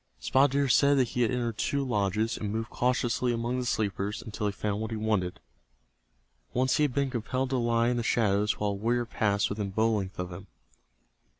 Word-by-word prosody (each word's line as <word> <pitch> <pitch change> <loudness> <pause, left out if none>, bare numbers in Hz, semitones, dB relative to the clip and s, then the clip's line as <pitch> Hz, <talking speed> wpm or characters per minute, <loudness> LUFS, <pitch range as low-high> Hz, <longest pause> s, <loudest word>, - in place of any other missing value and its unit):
Spotted 135 +1 +3
Deer 140 0 +2
said 140 +2 +4
that 125 -3 +2
he 125 - -2
had 115 - +3
entered 120 -3 -2
two 140 0 0
lodges, 105 -1 0
and 105 -2 -4
moved 115 +2 -3
cautiously 125 0 +1
among 120 +2 -1
the 125 - -2
sleepers 100 -1 -1
until 105 -1 -3
he - - 0
found 105 +1 -3
what 110 - -3
he 110 - -3
wanted. 105 -5 -1 1.2
Once 130 +2 +2
he 150 - +3
had 140 - -2
been 140 -2 +1
compelled 130 +2 -2
to 130 - +1
lie 120 -1 +2
in 125 - 0
the - - 0
shadows 105 -3 +1
while 105 -1 0
a - - -2
warrior 120 +4 0
passed 100 -3 +1
within 105 -1 -3
bow 110 +3 +2
length 95 -3 -2
of 90 0 -4
him. 95 +3 -9
115 Hz, 210 wpm, -28 LUFS, 105-125 Hz, 1.2 s, said